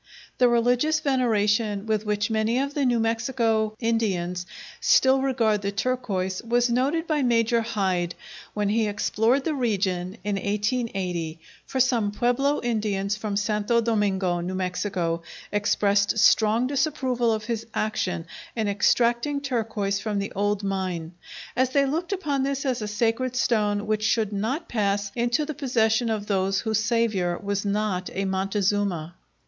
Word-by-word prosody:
The 250 - +6
religious 245 +6 +2
veneration 215 -7 +1
with 215 -1 -1
which 210 +2 0
many 220 +2 +1
of 280 +2 -1
the 285 -2 0
New 240 -1 +2
Mexico 225 -1 0
Indians 190 -6 -1 0.3
still 265 0 +4
regard 230 -6 +1
the 200 0 -2
turquoise 200 -5 -2
was 240 +1 +1
noted 280 +7 +1
by 310 -3 0
Major 235 -2 +2
Hyde, 190 -6 -1 0.4
when 205 -1 0
he 220 +1 +2
explored 225 +5 +1
the 315 - -1
region 195 -7 -1
in 205 -1 -1
1880, 195 -6 -2 0.3
for 265 - -3
some 240 -5 +2
Pueblo 245 +6 +1
Indians 210 -4 -1
from 210 -1 -3
Santo 210 +2 +1
Domingo, 200 -6 +1
New 180 +2 -3
Mexico, 180 -2 -2 0.3
expressed 205 0 +2
strong 220 +2 +4
disapproval 260 -4 0
of 215 -1 -1
his 230 -1 -3
action 180 -6 -1 0.3
in 220 -2 -1
extracting 235 +7 +2
turquoise 225 -7 -1
from 210 -1 -2
the 200 0 -2
old 205 +1 -1
mine, 185 -4 -2 0.4
as 260 +1 +2
they 275 +1 +3
looked 325 +7 -2
upon 300 -8 -1
this 275 +1 -1
as 255 -4 0
a 210 - -3
sacred 230 +4 0
stone 210 -4 +1
which 215 0 0
should 215 -1 +1
not 255 - -2
pass 200 -2 0
into 240 +5 +1
the 310 - -4
possession 235 -4 +1
of 215 -2 -2
those 195 -1 0
whose 220 -1 0
Saviour 215 -6 +1
was 200 -1 -2
not 200 -3 -1
a 195 - -1
Montezuma. 190 -3 -1
215 Hz, 150 wpm, -25 LUFS, 200-245 Hz, 0.4 s, The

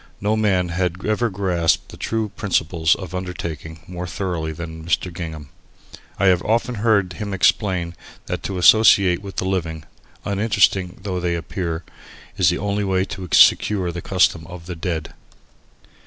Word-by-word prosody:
No 105 +2 +1
man 95 -5 +1
had 90 +1 -2
ever 110 +2 +1
grasped 90 -4 0
the - - -10
true 110 -1 -2
principles 85 -5 +1
of 95 -2 -8
undertaking 85 -4 -6
more 90 0 -6
thoroughly 85 -4 -3
than 80 0 -7
Mr. 85 +2 -1
Gingham. 80 -4 -7 0.7
I 100 - +1
have 90 -2 +4
often 115 +4 0
heard 100 -5 +2
him 100 +3 -4
explain 90 -3 +1 0.3
that - - -4
to 95 - -4
associate 95 -2 +6
with 100 -1 -9
the - - -2
living, 85 -5 -2 0.4
uninteresting 100 -2 +1
though 95 -3 -2
they 85 -1 -1
appear, 85 -1 -4 0.5
is 95 -5 +4
the 90 - 0
only 100 +1 -1
way 95 -1 +1
to 95 -2 -7
secure 95 -4 +5
the 90 +1 -6
custom 90 -3 +1
of 90 -2 -10
the 90 0 -6
dead. 80 -1 -4
90 Hz, 155 wpm, -21 LUFS, 85-100 Hz, 0.7 s, associate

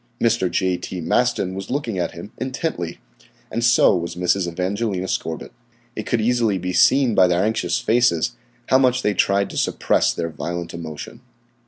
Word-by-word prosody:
Mr. 115 -5 +2
J. 90 +1 0
T. 90 +1 -6
Maston 95 +1 +1
was 95 0 -6
looking 120 -8 -2
at 85 - -2
him 85 +4 -9
intently, 130 - -3 0.5
and 115 - -2
so 120 -4 +5
was 85 -1 -3
Mrs. 90 +1 +1
Evangelina 95 +2 -2
Scorbitt. 80 -3 -3 0.4
It 110 - -5
could 120 - +1
easily 115 -3 +1
be 90 0 -3
seen 130 +3 +4
by 95 -3 +5
their 90 +1 +2
anxious 110 -5 0
faces 120 -4 +2 0.4
how 130 - +5
much 130 -1 +2
they 105 - +2
tried 100 +1 +1
to - - -7
supress - - +1
their 85 -1 -3
violent 85 +2 -5
emotion. 80 -3 -8
95 Hz, 170 wpm, -21 LUFS, 90-115 Hz, 0.5 s, so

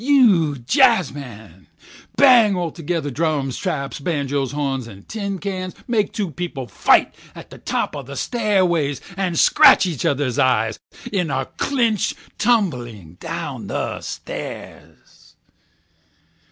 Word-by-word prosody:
you 215 - +4
jazzmen, 135 - 0 0.5
bang 235 -8 +6
altogether 165 -3 -3
drums, 145 -2 -1
traps, 150 -8 -3
banjoes, 140 -3 -2
horns, 135 -4 -3 0.2
tin 200 -3 -4
cans—make 200 +4 -3
two 200 -6 -3
people 165 -6 -5
fight 105 - +3 0.2
on - - -10
the - - -11
top - - -2
of 140 -2 -8
a 140 - -7
stairway 185 - +1 0.2
and 185 -3 -2
scratch - - +6
each 165 -7 -3
other's 135 -3 0
eyes 110 -4 +2 0.3
in 180 -5 0
a 135 -1 -1
clinch 235 -7 +1 0.2
tumbling 120 - 0
down - - -5
the - - -3
stairs. - - -9
160 Hz, 115 wpm, -21 LUFS, 135-200 Hz, 0.5 s, bang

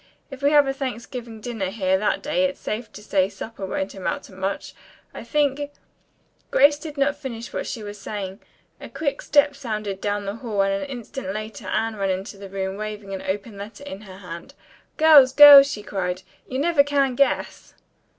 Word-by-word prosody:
If 270 0 -9
we 285 - +4
have 295 -1 +6
a 270 - 0
Thanksgiving 245 -3 -6
dinner 220 -5 -3
here 190 -2 +1
that 205 +2 0
day 280 -2 +1
it's 275 0 -3
safe 220 +2 -4
to 210 - -11
say 195 -2 +1
supper 200 0 -7
won't 190 +1 -3
amount 200 +9 -3
to - - -14
much. 190 +1 -4 0.4
I - - -8
think 290 -1 0 0.4
" - - -41
Grace 290 +2 +5
did 305 -2 -8
not 280 +1 +2
finish 235 -4 -7
with - - -21
what - - -4
she 225 - -5
was 205 0 -8
saying. 195 -1 -5 0.4
A - - -9
quick 285 -3 -2
step 285 0 +3
sounded 215 -7 -4
down 205 0 -2
the 200 +2 -4
hall 215 -5 -1
and 195 0 +1
an 285 - -6
instant 245 -4 -6
later 215 +1 -6
Anne 225 0 -1
ran 195 -1 -1
into 190 +1 -4
the 200 -1 -9
room 190 0 -3
waving 210 -2 -6
an 190 - -4
open 200 +2 -4
letter 215 +7 -9
in 205 -8 -8
her 190 -3 -12
hand. 180 +8 -10 0.4
"Girls, 295 -5 +7
girls!" 285 -1 +10
she 210 - -6
cried, 185 -2 -3 0.2
"you 260 - -4
never 310 +1 +4
can 280 -2 +1
guess!" 275 +2 -1
220 Hz, 200 wpm, -23 LUFS, 195-275 Hz, 0.4 s, girls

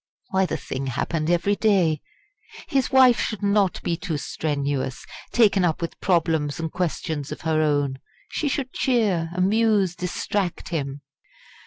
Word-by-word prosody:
why 190 0 +2
the - - -2
thing 135 +1 -5
happened 155 +5 -1
every 175 +4 +2
day. 185 -9 +2 0.7
His 270 -2 +1
wife 260 -3 +6
should 215 -2 -2
not 200 -2 +2
be 170 - 0
too 165 -2 -3
strenuous, 140 -4 -2 0.3
taken 205 -5 +4
up 165 -3 +1
with 170 - -5
problems 165 -4 +1
and 165 -1 -3
questions 160 -4 -3
of - - -6
her 160 -1 +1
own. 145 -3 +1 0.3
She 305 - -2
should 270 -2 -2
cheer, 205 -10 +1
amuse, 200 -1 +2
distract 180 +1 -2
him. 145 -4 -3
175 Hz, 145 wpm, -24 LUFS, 155-205 Hz, 0.7 s, wife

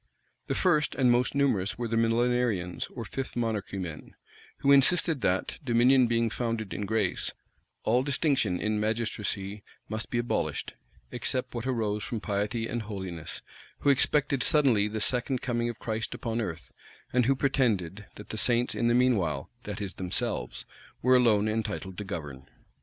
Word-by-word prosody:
The - - -1
first 155 -5 +2
and 125 -2 +4
most 120 +3 +2
numerous 110 -8 +1
were 120 0 -2
the 115 - -1
Millenarians, 115 -5 +1
or 115 -3 -5
Fifth 135 +3 -5
Monarchy 110 -5 -2
men, 85 -5 -6 0.5
who 140 - +4
insisted 150 +1 +4
that, 95 -2 0
dominion 125 +1 +5
being 115 -1 +1
founded 115 -4 -2
in 100 - -3
grace, 105 -3 0 0.5
all 120 +3 +3
distinction 135 - +1
in 110 0 0
magistracy 105 -2 -2 0.3
must 110 0 -3
be 120 - -1
abolished, 120 0 -1 0.4
except 130 -1 -2
what 120 +1 -4
arose 105 -5 -1
from 110 +3 -3
piety 105 +2 -1
and 120 +1 -2
holiness; 95 -6 -6 0.4
who 140 - +5
expected 140 0 +2
suddenly 125 -8 +4
the 110 +1 -3
second 125 +3 0
coming 120 -1 0
of 120 - -5
Christ 110 0 -3
upon 115 0 -2
earth; 85 -7 -5 0.4
and 125 -1 +3
who 135 - +4
pretended, 110 - 0
that 105 - -11
the 110 - -2
saints 120 +1 +1
in 120 - 0
the 120 - +4
mean 125 -1 +4
while, 75 -7 -2
that - - -5
is, 100 -2 -4
themselves, 90 -8 -3 0.4
were 130 +1 +6
alone 110 -4 +4
entitled 105 -4 -3
to - - -3
govern. 75 -8 -6
115 Hz, 165 wpm, -28 LUFS, 105-125 Hz, 0.5 s, were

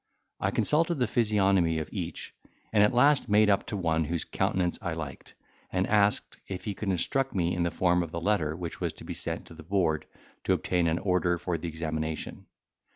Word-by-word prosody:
I - - +1
consulted 165 +3 +2
the 125 -4 +1
physiognomy 100 -7 +2
of 80 - -3
each, - - -5 0.4
and 105 - +5
at 105 - +4
last 140 +2 +4
made 105 0 +5
up 100 - +1
to 105 - -3
one 80 -3 +1
whose 85 +1 -2
countenance 90 -2 0
I 85 - -2
liked, 75 -5 -7 0.4
and 95 0 +1
asked, 105 -1 +2
if 95 -1 -6
he 105 - -2
could 100 +1 -4
instruct 135 +9 0
me 90 -1 +1
in 90 - -1
the 85 - +2
form 90 +1 +2
of 85 - -3
the 85 - -4
letter 85 -5 +1
which 85 -1 -6
was - - -1
to - - -12
be - - -5
sent - - -4
to - - -13
the 80 - -11
Board 85 -2 0 0.4
to - - +3
obtain 90 -2 +1
an 80 0 +1
order 90 -2 +1
for 90 +1 -3
examination? 80 -1 -4
90 Hz, 205 wpm, -28 LUFS, 80-105 Hz, 0.4 s, and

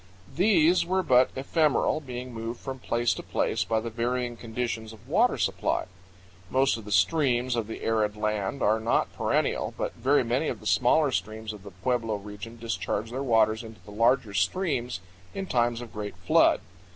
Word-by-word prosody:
These 175 -3 +4
were 185 +2 0
but 130 -4 +5
ephemeral, 150 +2 +1
being 125 -3 -7
moved 115 +1 -5
from 135 -1 -6
place 120 -1 +1
to - - -6
place - - 0
by 110 -1 0
the 115 +1 -5
varying 120 +1 -1
conditions 115 -1 -4
of 110 +2 -16
water 225 - +3
supply. - - 0 0.6
Most 135 +3 +3
of 115 -3 -8
the 105 - -8
streams 125 - +2
of 115 -3 -2
the 110 - -7
arid 105 -2 0
land 105 +3 -1
are 110 +2 +3
not 115 +1 0
perennial, - - 0
but - - -2
very 140 +1 +2
many 125 +6 0
of - - -3
the - - -15
smaller 125 +8 +3
streams 110 +3 -3
of 105 - -11
the 100 - -10
pueblo 115 +4 -1
region 105 +3 -8
discharge 110 0 -3
their 130 +2 -3
waters 110 -3 +2
into 110 -1 -11
the 105 - -11
larger 115 +1 +2
streams 125 - 0 0.3
in 195 - -3
times 120 -6 +1
of 120 - -10
great 105 -1 -6
flood. - - +4
120 Hz, 180 wpm, -27 LUFS, 110-130 Hz, 0.6 s, but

